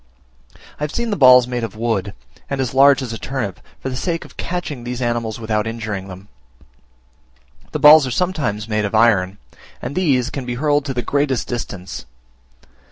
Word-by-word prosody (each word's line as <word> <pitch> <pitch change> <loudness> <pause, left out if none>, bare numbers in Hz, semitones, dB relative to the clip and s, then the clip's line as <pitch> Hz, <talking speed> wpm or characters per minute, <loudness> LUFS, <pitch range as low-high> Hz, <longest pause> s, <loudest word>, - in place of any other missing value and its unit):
I - - -4
have 150 - -2
seen 235 +3 -2
the - - +1
balls 125 -5 +7
made 125 -1 -3
of 110 -2 -5
wood, 110 -4 -2 0.3
and 140 - -2
as 130 -2 -1
large 135 0 +5
as 120 -3 -5
a 115 - -6
turnip, 120 -9 -4 0.2
for - - -6
the 130 - -4
sake 165 +5 -2
of - - -16
catching 170 -8 -4
these 125 0 -4
animals 120 -2 -2
without 110 -1 -1
injuring 110 -4 -4
them. 95 +1 -11 1.4
The - - -2
balls 150 -1 +8
are - - -4
sometimes 140 - -1
made 105 -1 0
of 105 +1 -2
iron, 100 -4 +3 0.4
and 125 - -5
these 135 -9 +1
can 135 - -4
be 120 - -2
hurled 145 +1 +1
to 135 -2 -4
the 120 - -2
greatest 135 -7 0
distance. 100 - -6
125 Hz, 185 wpm, -19 LUFS, 110-140 Hz, 1.4 s, balls